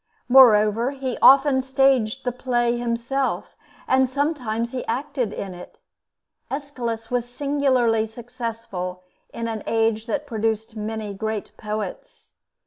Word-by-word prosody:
Moreover, 230 -2 +6
he 265 -3 -4
often 270 0 +6
"staged" 265 -3 +2
the 250 - +1
play 240 -1 0
himself, 240 +3 -2 0.3
and 260 0 +3
sometimes 255 -5 -1
he 255 - -4
acted 245 -1 -2
in 195 -3 -5
it. 180 0 -12 0.7
Aeschylus 245 -5 -4
was 245 -1 -1
singularly 255 -4 +1
successful 225 -6 -6 0.3
in 230 0 -4
an 220 -2 -4
age 225 0 +1
that 290 +5 -2
produced 225 -2 -2
many 215 -1 -4
great 220 +1 -4
poets. 215 - -6
235 Hz, 120 wpm, -23 LUFS, 220-265 Hz, 0.7 s, Moreover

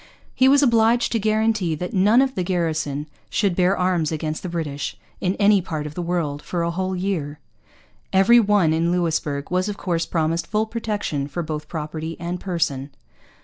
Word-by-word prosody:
He 260 - +4
was 280 +1 +5
obliged 235 -1 +3
to 230 - +1
guarantee 215 -5 +1
that 180 +4 -5
none 210 +7 +5
of 265 -1 -2
the 190 - -2
garrison 160 -5 -1 0.2
should 200 -4 +1
bear 185 +2 +2
arms 180 -4 +1
against 155 0 -3
the 185 - -5
British, 155 -4 -4 0.2
in 185 +1 0
any 205 -1 +4
part 155 -4 -4
of 150 - -6
the 175 - -4
world, 165 -4 -2
for 170 +1 -3
a 170 - 0
whole 185 +2 -2
year. 175 -6 -2 0.7
Every 195 +5 +6
one 200 -7 +3
in 165 +2 +1
Louisbourg 160 -5 -1
was 185 +3 +1
of 205 - -4
course 170 -3 -1
promised 165 0 0
full 215 0 0
protection 210 -11 -3
for 170 +4 -4
both 155 -1 -5
property 160 0 -5
and 175 +1 -4
person. 145 -7 -2
175 Hz, 185 wpm, -22 LUFS, 160-205 Hz, 0.7 s, Every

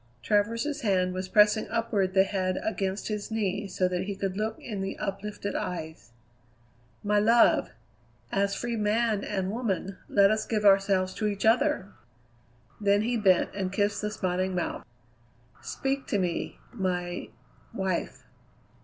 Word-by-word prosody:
Travers's 230 - 0
hand 185 -4 +1
was 185 0 -4
pressing 210 +1 +4
upward 215 -4 0
the 190 - +7
head 185 -2 -1
against 195 -2 -2
his 210 -2 -3
knee 205 -2 -1
so 185 -1 0
that 180 0 -2
he 200 0 -4
could 190 -1 -3
look 220 +2 -2
in 210 -5 -5
the 195 - -4
uplifted 200 +1 -4
eyes. 160 -7 -5 0.9
"My 210 0 +3
love! 230 +3 +4 0.6
as 200 0 +1
free 240 -1 -3
man 215 0 +1
and 190 -2 -2
woman, 195 -5 -2
let 200 0 +5
us 215 0 -1
give 215 -2 -1
ourselves 195 -1 +4
to 215 - -1
each 200 -1 -2
other!" 235 -3 +2 0.9
Then 205 0 +3
he 240 +2 0
bent 195 -5 +3
and 190 -2 -2
kissed 205 +1 0
the 210 - -1
smiling 185 -2 -1
mouth. 175 - -2 0.8
"Speak 270 0 -3
to 205 - 0
me, 180 -3 -2 0.2
my 180 -4 -2 0.4
wife." 190 -3 -3
200 Hz, 145 wpm, -28 LUFS, 190-215 Hz, 0.9 s, the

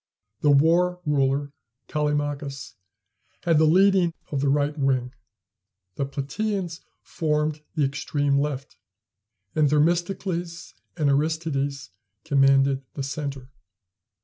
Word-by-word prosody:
The 150 - +2
War 170 +5 +4
ruler, 140 -1 +1 0.3
Callimachus, 145 -3 -2 0.7
had 165 -3 +3
the 160 - +5
leading 185 0 +4 0.2
of 140 -2 -1
the 140 - +2
right 145 +1 +1
wing; 130 -3 0 0.8
the 135 - -2
Platæans 175 +5 -3 0.2
formed 150 -2 -1
the 150 -3 +2
extreme 140 0 0
left; 140 -2 -3 0.8
and 155 -2 +3
Themistocles 170 +2 -1 0.2
and 150 -3 +1
Aristides 140 - -1 0.3
commanded 135 -2 +3
the 140 - -3
centre. 140 -2 -5
145 Hz, 100 wpm, -25 LUFS, 140-165 Hz, 0.8 s, the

